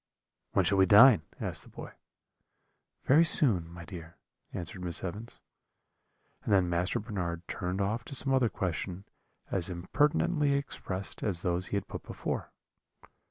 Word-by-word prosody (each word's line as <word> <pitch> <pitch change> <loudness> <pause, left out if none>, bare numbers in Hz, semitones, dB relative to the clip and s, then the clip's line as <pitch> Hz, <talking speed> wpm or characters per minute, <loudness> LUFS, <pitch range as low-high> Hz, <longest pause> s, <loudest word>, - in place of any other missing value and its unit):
"'When - - +3
shall 100 -1 +3
we 95 - +5
dine?' 110 +3 +8 0.2
asked - - -3
the - - -16
boy. - - -9 1.1
"'Very 150 +5 +6
soon, 105 - +3
my 85 0 -10
dear,' 85 -2 -10 0.3
answered 90 +2 -6
Miss 85 -1 -1
Evans. 105 +6 -6 1.0
"And - - -3
then 95 -3 +4
Master 85 +1 0
Bernard 90 -6 -4
turned 90 +2 -3
off 110 +4 -1
to 140 - -5
some 135 +1 +3
other 130 -3 +3
question, 90 0 -4 0.5
as 90 -1 0
impertinently 145 - +1
expressed 100 -9 -4
as 90 -5 -2
those 90 +1 -1
he 100 - -1
had 100 - -4
put - - -7
before. - - -5
95 Hz, 150 wpm, -30 LUFS, 90-115 Hz, 1.1 s, dine